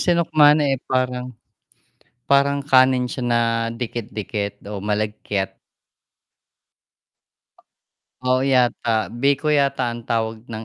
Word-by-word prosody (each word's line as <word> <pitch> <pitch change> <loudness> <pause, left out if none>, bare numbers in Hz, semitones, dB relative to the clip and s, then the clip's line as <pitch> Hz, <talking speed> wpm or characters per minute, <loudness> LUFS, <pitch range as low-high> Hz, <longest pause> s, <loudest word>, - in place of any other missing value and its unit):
sinukmane, 155 -4 +3
eh, 135 - -6
parang 125 -1 -1 1.0
parang 140 0 +3
kanin 130 -2 +4
siya 125 +1 -5
na 120 -1 +2 0.3
dikit-dikit 110 -3 -5
o 100 -2 -5
malagkit. 105 -2 -2 2.7
Oo 130 0 +3
yata, 125 -2 +1 0.3
biko 140 +2 +1
yata 140 -1 0
ang 120 - -8
tawag 110 -1 -2
ng 110 0 -6
125 Hz, 95 wpm, -21 LUFS, 110-140 Hz, 2.7 s, kanin